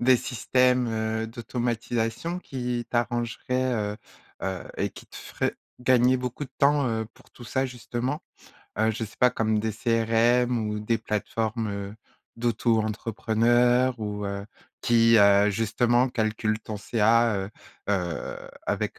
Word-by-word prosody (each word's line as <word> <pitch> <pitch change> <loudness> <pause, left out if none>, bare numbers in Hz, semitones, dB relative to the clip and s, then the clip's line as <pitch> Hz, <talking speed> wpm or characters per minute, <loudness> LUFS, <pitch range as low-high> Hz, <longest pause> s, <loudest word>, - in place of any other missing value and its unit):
des 125 +1 +5
systèmes, 125 +1 +1
heu, 110 0 -1
d'automatisation 120 +5 -2
qui 125 -6 -3
t'arrangeraient, 120 +2 -1 0.2
heu - - -8 0.5
heu 95 -2 -3 0.2
et - - +1
qui - - -13
te - - -19
feraient - - -3 0.2
gagner 125 0 +4
beaucoup 125 +3 -4
de 130 - -14
temps, 140 -1 +4
heu, 110 -1 -1
pour - - -22
tout 120 - -13
ça 130 +4 0
justement? 125 +3 -4 0.6
Heu, 110 0 +3
je 115 - -5
sais 105 - -12
pas, 125 0 +5
comme 110 -1 0
des 110 0 -1
CRM 115 +2 +2
ou 105 0 -2
des 110 +2 0
plateformes 105 -2 -3 0.4
d'auto-entrepreneurs 115 +2 +2
ou, 105 -1 -4
heu, 100 0 -4 0.3
qui, 115 -1 +5
heu, 100 0 +6
justement, 120 +4 +2
calculent 110 -2 -1
ton 110 0 -6
CA, 115 +2 +3
heu 95 +1 -4 0.4
heu, 90 -4 -3 0.2
avec - - -2
115 Hz, 135 wpm, -26 LUFS, 110-125 Hz, 0.6 s, heu